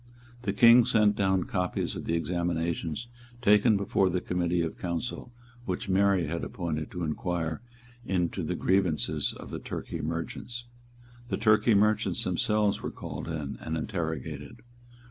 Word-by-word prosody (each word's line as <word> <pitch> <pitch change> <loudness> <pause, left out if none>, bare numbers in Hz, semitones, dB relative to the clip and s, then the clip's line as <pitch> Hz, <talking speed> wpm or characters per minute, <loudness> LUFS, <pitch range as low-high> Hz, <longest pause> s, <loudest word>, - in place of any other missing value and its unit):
The 105 - -1
King 115 +4 +7
sent 105 -2 +4
down 95 -2 +2
copies 90 0 -2
of - - -6
the 85 - 0
examinations 85 +2 -1 0.3
taken 105 -1 +5
before 100 -1 +2
the 90 0 0
Committee 90 -1 0
of 80 - -4
Council 90 +8 -4 0.3
which 95 +1 -3
Mary 95 -2 +3
had 85 +3 -3
appointed 80 -4 -3
to 90 - -5
inquire 80 0 -2 0.4
into 90 -6 -1
the - - -2
grievances 95 -5 +1
of - - -10
the - - -4
Turkey 85 - -5
merchants. 85 +10 -4 0.6
The - - -1
Turkey 110 +1 +4
merchants 105 +2 +2
themselves 105 -1 +1
were - - -3
called - - -7
in 75 -4 -4
and 80 +1 -3
interrogated. 80 -5 -4
90 Hz, 145 wpm, -28 LUFS, 85-105 Hz, 0.6 s, King